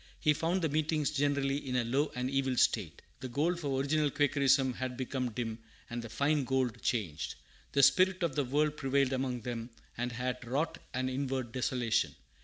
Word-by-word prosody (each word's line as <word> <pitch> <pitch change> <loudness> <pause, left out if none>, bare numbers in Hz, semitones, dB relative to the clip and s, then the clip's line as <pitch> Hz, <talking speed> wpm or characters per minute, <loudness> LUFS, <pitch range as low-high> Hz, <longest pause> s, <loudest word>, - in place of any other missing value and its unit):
He 150 -1 +4
found 170 +4 0
the 160 - +2
meetings 155 0 +1
generally 140 -1 +1
in 130 -3 -4
a 125 - +2
low 135 +6 +1
and 125 0 -1
evil 135 -1 0
state. 100 -11 +1 0.2
The 130 - -5
gold 160 +8 0
of 160 - -7
original 140 +2 +1
Quakerism 140 -2 +3
had 125 0 -4
become 130 -1 -2
dim, 115 0 -4 0.3
and 120 0 -3
the 115 - -8
fine 140 +5 +1
gold 130 -3 0
changed. 95 - -2 0.4
The 140 - +4
spirit 185 +4 +5
of 165 -5 +1
the 145 - +2
world 150 +3 +1
prevailed 135 -1 +1
among 130 -2 -1
them, 115 0 -4 0.3
and 120 +1 -2
had 125 +2 -3
wrought 135 +7 -1 0.2
an 130 0 0
inward 130 -2 -2
desolation. 125 -2 0
135 Hz, 185 wpm, -32 LUFS, 125-145 Hz, 0.4 s, spirit